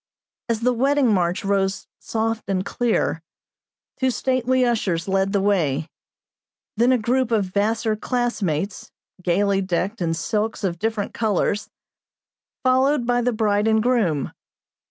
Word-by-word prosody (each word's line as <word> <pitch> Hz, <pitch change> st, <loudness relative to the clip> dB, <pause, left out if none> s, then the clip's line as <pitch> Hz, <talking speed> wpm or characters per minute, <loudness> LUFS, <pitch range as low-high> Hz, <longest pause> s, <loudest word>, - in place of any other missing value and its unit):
As 230 Hz, -1 st, 0 dB
the 250 Hz, +1 st, +2 dB
wedding 270 Hz, -1 st, +2 dB
march 180 Hz, +2 st, 0 dB
rose 195 Hz, 0 st, 0 dB
soft 225 Hz, -2 st, -2 dB
and 190 Hz, -1 st, 0 dB
clear, 230 Hz, -8 st, 0 dB, 0.8 s
two 260 Hz, 0 st, +2 dB
stately 255 Hz, 0 st, +1 dB
ushers 200 Hz, -8 st, 0 dB
led 195 Hz, 0 st, +1 dB
the 200 Hz, -, +2 dB
way; 165 Hz, -7 st, +1 dB, 0.9 s
then 240 Hz, +4 st, +3 dB
a 255 Hz, -, +4 dB
group 245 Hz, +2 st, 0 dB
of 220 Hz, -4 st, +2 dB
Vassar 215 Hz, +3 st, 0 dB
classmates, 210 Hz, -, -2 dB, 0.3 s
gayly 195 Hz, +2 st, +1 dB
decked 190 Hz, +3 st, -2 dB
in 165 Hz, -1 st, 0 dB
silks 215 Hz, +6 st, -2 dB
of 175 Hz, -3 st, -1 dB
different 220 Hz, -1 st, -2 dB
colors, 210 Hz, -1 st, 0 dB, 0.9 s
followed 260 Hz, +1 st, +3 dB
by 245 Hz, 0 st, +2 dB
the 250 Hz, +1 st, +1 dB
bride 210 Hz, -2 st, +1 dB
and 220 Hz, -1 st, +3 dB
groom. 210 Hz, -, +1 dB
215 Hz, 135 wpm, -22 LUFS, 190-240 Hz, 0.9 s, a